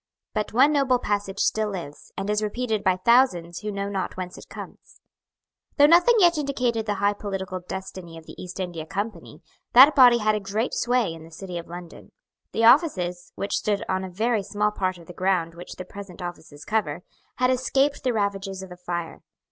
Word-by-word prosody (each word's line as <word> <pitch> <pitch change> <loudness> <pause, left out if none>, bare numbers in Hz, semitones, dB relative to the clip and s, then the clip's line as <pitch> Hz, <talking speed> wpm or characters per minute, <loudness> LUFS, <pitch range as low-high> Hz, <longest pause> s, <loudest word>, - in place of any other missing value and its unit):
But 215 -1 -2
one 270 +6 +5
noble 270 -3 +3
passage 205 -4 -2
still 215 +1 +1
lives, 170 -7 -8
and 195 - -3
is 210 0 +1
repeated 215 0 -2
by 185 -2 +3
thousands 185 -6 +3
who 210 0 -4
know 200 0 -3
not 195 -2 -3
whence 180 -1 -5
it - - -13
comes. - - -11 0.8
Though 290 - +7
nothing 350 +9 +6
yet 345 -5 +5
indicated 250 -6 -1
the 205 - 0
high 200 +1 +2
political 195 -3 -5
destiny 185 -2 -8
of 160 - -12
the - - -11
East 180 +1 -8
India 170 -4 -4
Company, 205 +5 -5 0.3
that 270 +5 +9
body 250 -4 +8
had 215 -1 +2
a 210 - 0
great 210 +4 -2
sway 240 -8 +1
in 165 -1 -11
the 165 - -13
City 175 +1 -7
of 165 - -10
London. 175 0 -10 0.4
The 225 - +1
offices, 185 - +3
which 200 - -3
stood 205 -1 -1
on 190 0 -1
a 190 - -5
very 220 +4 0
small 210 +1 -1
part 185 -3 -2
of 170 - -14
the 175 - -11
ground 180 -3 0
which 175 +1 -9
the 185 - -7
present 195 -1 -10
offices 165 -4 -8
cover, 180 -7 -1 0.3
had 255 0 +2
escaped 270 +3 +1
the 255 - +2
ravages 195 -3 -2
of 190 - -10
the 180 - -9
fire. 175 -2 -5
200 Hz, 200 wpm, -25 LUFS, 180-235 Hz, 0.8 s, that